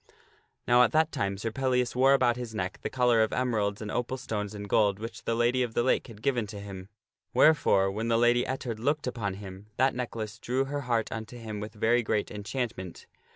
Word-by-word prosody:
Now 120 +1 +6
at 125 - +4
that 160 0 +3
time 100 0 -2
Sir 115 +3 -3
Pellias 125 0 0
wore 135 +2 +5
about 125 -3 +3
his 120 -3 -6
neck 90 -3 -3
the - - -3
collar 125 -3 +3
of 110 - +2
emeralds 110 -5 0
and 105 - -5
opal 125 +2 -2
stones 105 -5 -4
and 100 0 -6
gold 100 -1 +3
which 115 +2 -8
the 115 - 0
Lady 120 +2 +2
of 120 -2 -2
the 120 - +2
Lake 130 - +1
had 110 -3 -13
given 125 -6 +1
to 100 0 -8
him. 95 -1 -8 0.5
Wherefore, 100 -11 +4
when 110 +3 -3
the 115 -1 +3
Lady 120 +1 +4
Ettard 125 -3 -4
looked 145 +6 0
upon 115 -6 -3
him, 95 0 -10
that 130 +1 +3
necklace 115 -3 -5
drew 130 +3 0
her 145 +1 -3
heart 115 -2 +1
unto 110 +2 -6
him 110 -3 -6
with 105 +1 -7
very 115 +3 +3
great 105 -2 -1
enchantment. 105 -3 -5
115 Hz, 215 wpm, -28 LUFS, 105-125 Hz, 0.5 s, Now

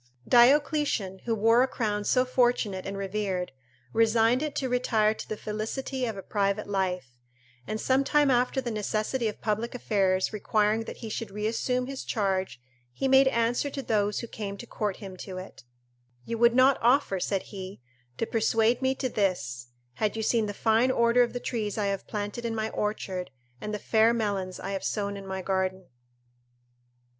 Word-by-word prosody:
Diocletian, 250 - +3
who 230 -1 +1
wore 225 +3 +4
a 260 - +3
crown 210 -5 -2
so 255 +3 +3
fortunate 240 -7 +1
and 195 0 -4
revered, 195 -2 -2 0.4
resigned 225 +2 +3
it 305 -2 -3
to 265 - -1
retire 230 -4 +2
to - - -9
the 215 - -3
felicity 235 +6 -3
of 220 -3 -4
a 195 - -7
private 200 0 0
life; 180 -11 -2 0.5
and 215 - -3
some 265 +3 +2
time 295 0 +3
after 250 +1 +2
the 245 -2 -3
necessity 215 +3 -1
of 210 - -5
public 220 +3 -1
affairs 195 -5 +1
requiring 215 +1 +1
that - - -7
he - - -5
should 225 0 -4
reassume 225 +5 -1
his 270 0 -6
charge, 190 - -1 0.3
he 270 - -2
made 265 0 +6
answer 240 +2 +1
to 275 -1 -5
those 210 -3 0
who 235 - -6
came 200 -3 -6
to 240 - -8
court 210 -4 -3
him 190 -3 -9
to 185 0 -7
it: 185 -7 -9 0.6
"You 230 -1 -4
would 235 0 +5
not 260 +1 +5
offer," 240 -5 +3
said 195 +1 -1
he, 190 0 -7 0.4
"to - - 0
persuade 225 +2 +2
me 265 0 +1
to 260 - -2
this, 180 - -1 0.3
had 215 - -1
you 220 - -2
seen 220 -1 +2
the 205 - -5
fine 225 +4 +3
order 235 -1 +4
of 240 - +1
the 245 - -3
trees 220 -4 -3
I 210 - 0
have 195 - -7
planted 210 +2 -4
in 230 -1 -2
my 220 0 -2
orchard, 190 -3 -3 0.3
and 210 - -4
the 210 - -2
fair 225 +3 +3
melons 200 -5 -2
I 195 - -5
have 195 -1 -3
sown 200 -1 -2
in 195 -1 -8
my 190 0 -4
garden." 190 -1 -1
215 Hz, 185 wpm, -27 LUFS, 200-240 Hz, 0.6 s, made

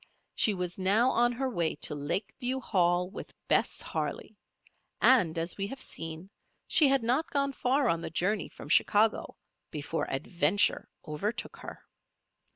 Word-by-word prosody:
She 210 - +2
was 180 0 -4
now 210 +7 +3
on 240 +1 +3
her 265 +3 -2
way 170 -10 0
to 150 - -2
Lakeview 225 - -2
Hall 180 -6 +1
with 190 - -10
Bess - - +1
Harley; - - -4 0.6
and, 185 -11 +4
as 165 +1 -1
we 195 0 -2
have 270 +5 -8
seen, 165 +4 -5 0.4
she 305 - +5
had 270 -3 +2
not 255 +8 +1
gone 280 -1 0
far 265 +1 +1
on 165 -5 +1
the - - -5
journey 185 +5 -1
from - - -12
Chicago 210 +7 +2 0.3
before 155 +2 -3
Adventure 165 +7 +1 0.2
overtook 205 +10 -3
her. - - -10
200 Hz, 150 wpm, -29 LUFS, 170-245 Hz, 0.6 s, she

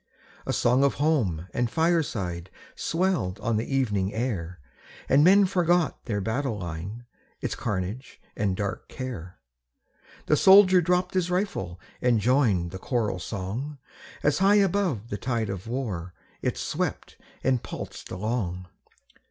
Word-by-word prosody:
A - - +1
song 125 +3 +3
of 140 - +3
home 115 - +1
and 120 -1 0
fireside 115 - 0 0.3
Swelled 165 - 0
on 115 -1 0
the 115 - -3
evening 105 -7 0
air, 90 -8 -3 0.5
And 140 +2 +5
men 195 +4 +7
forgot 175 -2 +1
their 105 -4 -1
battle 115 +3 -1
line, 90 +6 -6 0.3
Its - - -2
carnage 105 +4 -4 0.2
and 100 -3 0
dark 100 0 -4
care; 100 -9 -6 0.9
The 150 - +3
soldier 190 +2 +7
dropp'd 180 +1 +1
his 185 -2 +1
rifle 180 - -2 0.2
And 120 -3 +3
joined 105 -8 +2
the 95 - -7
choral 105 -5 -1
song, 110 +11 -4 0.5
As 150 +3 +2
high 195 +2 +5
above 185 - +1
the 100 - -3
tide 115 -4 -1
of 95 +1 -6
war 105 -9 -4 0.3
It - - -1
swept - - -3 0.3
and 130 -2 +2
pulsed - - -7
along. 90 -3 -3
120 Hz, 135 wpm, -26 LUFS, 95-155 Hz, 0.9 s, men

